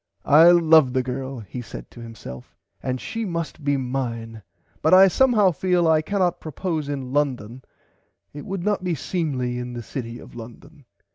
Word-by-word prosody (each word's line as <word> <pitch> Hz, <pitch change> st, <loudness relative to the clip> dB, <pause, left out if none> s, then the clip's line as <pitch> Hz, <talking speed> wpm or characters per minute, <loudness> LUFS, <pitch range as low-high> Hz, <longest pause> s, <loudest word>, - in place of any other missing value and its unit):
I 160 Hz, +4 st, +7 dB
love 160 Hz, -6 st, +5 dB
the 130 Hz, -1 st, +1 dB
girl 130 Hz, 0 st, -5 dB
he 110 Hz, +4 st, -7 dB
said 110 Hz, -, -10 dB
to -, -, -13 dB
himself 110 Hz, -, -10 dB, 0.3 s
and 130 Hz, 0 st, -3 dB
she 225 Hz, -, -4 dB
must 170 Hz, -5 st, -4 dB
be 140 Hz, 0 st, +1 dB
mine 120 Hz, -4 st, -4 dB, 0.4 s
but 160 Hz, +4 st, +5 dB
I 190 Hz, +1 st, +8 dB
somehow 215 Hz, -2 st, +4 dB
feel 180 Hz, 0 st, +1 dB
I 160 Hz, -1 st, +4 dB
can 200 Hz, +6 st, -3 dB
not 180 Hz, -3 st, +1 dB
propose 155 Hz, -1 st, -4 dB
in 135 Hz, -3 st, -5 dB
London 130 Hz, -5 st, -1 dB, 0.7 s
it 145 Hz, 0 st, -8 dB
would 190 Hz, -2 st, -5 dB
not 205 Hz, -2 st, 0 dB
be 180 Hz, -2 st, -1 dB
seemly 130 Hz, -6 st, -2 dB
in 125 Hz, 0 st, -6 dB
the 120 Hz, -1 st, -6 dB
city 115 Hz, -1 st, -6 dB
of -, -, -13 dB
London. 125 Hz, +6 st, -12 dB
145 Hz, 180 wpm, -23 LUFS, 125-170 Hz, 0.7 s, I